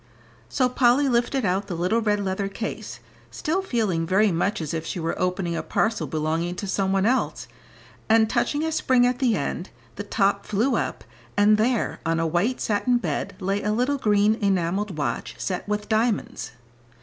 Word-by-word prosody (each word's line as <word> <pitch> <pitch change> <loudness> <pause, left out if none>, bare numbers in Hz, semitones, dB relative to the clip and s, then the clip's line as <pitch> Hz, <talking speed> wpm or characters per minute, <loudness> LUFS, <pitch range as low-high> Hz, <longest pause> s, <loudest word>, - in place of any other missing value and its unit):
So 255 -2 +2
Polly 250 +2 +3
lifted 245 0 +1
out 195 +2 0
the 180 - -4
little 180 +7 +1
red 210 -2 +1
leather 195 0 -2
case, 195 - -6 0.3
still 340 +5 -1
feeling 210 - -1
very 195 +3 +3
much 175 +5 0
as 160 -2 -4
if 160 -1 -2
she 170 - -4
were 165 0 -1
opening 180 -1 -1
a - - -1
parcel 225 0 0
belonging 160 +3 -1
to 200 - -5
some 195 0 0
one 195 0 +2
else, 255 +3 0 0.6
and 220 0 +5
touching 290 +6 0
a 320 - -1
spring 255 -5 +3
at 250 0 0
the 245 -5 +2
end, 175 +3 -3 0.3
the 205 - -3
top 200 -1 0
flew 220 +6 +1
up, - - -2 0.3
and 205 +1 +6
there 235 +1 0
on 165 0 0
a 165 - +1
white 180 +10 0
satin 235 +4 +1
bed 240 - -3
lay 195 +1 -1
a 210 - 0
little 255 +5 0
green 210 -2 +3
enamelled 190 -1 0
watch 150 - -3
set 185 0 -3
with 210 0 -2
diamonds. 220 - -1
205 Hz, 185 wpm, -24 LUFS, 180-235 Hz, 0.6 s, and